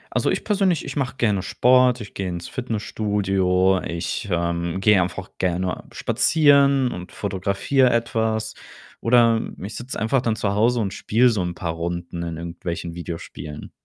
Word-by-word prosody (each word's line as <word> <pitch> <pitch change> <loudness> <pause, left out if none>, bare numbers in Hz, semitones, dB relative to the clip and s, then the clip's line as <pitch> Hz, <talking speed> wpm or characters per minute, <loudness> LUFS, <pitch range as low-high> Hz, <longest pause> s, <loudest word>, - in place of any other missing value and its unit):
Also, - - +2
ich - - -1
persönlich, 195 -6 +1
ich - - -6
mache 130 -2 -2
gerne 105 -5 +1
Sport, 125 +4 +3
ich 105 - -9
gehe 95 -1 -3
ins 85 -1 -5
Fitnessstudio, 95 -5 0
ich, 85 +5 -3
ähm, 85 +1 -1
gehe 100 -2 +5
einfach 90 +2 -4
gerne 90 -1 -1
spazieren 140 -4 +4
und 90 0 -8
fotografiere 100 +7 +1
etwas 110 -2 0 0.5
oder 115 -1 +4 0.2
ich 100 +3 -6
sitze 125 +2 -6
einfach 115 +4 +1
dann 115 -3 +1
zu 100 -2 -1
Hause 115 +3 +2
und 100 -3 -2
spiele 120 +4 +3
so 110 -6 0
'n 90 -1 -3
paar 85 -1 -3
Runden 85 +1 -4
in 85 -1 -4
irgendwelchen 85 0 -5
Videospielen. 85 -3 -7
100 Hz, 155 wpm, -22 LUFS, 90-120 Hz, 0.5 s, gehe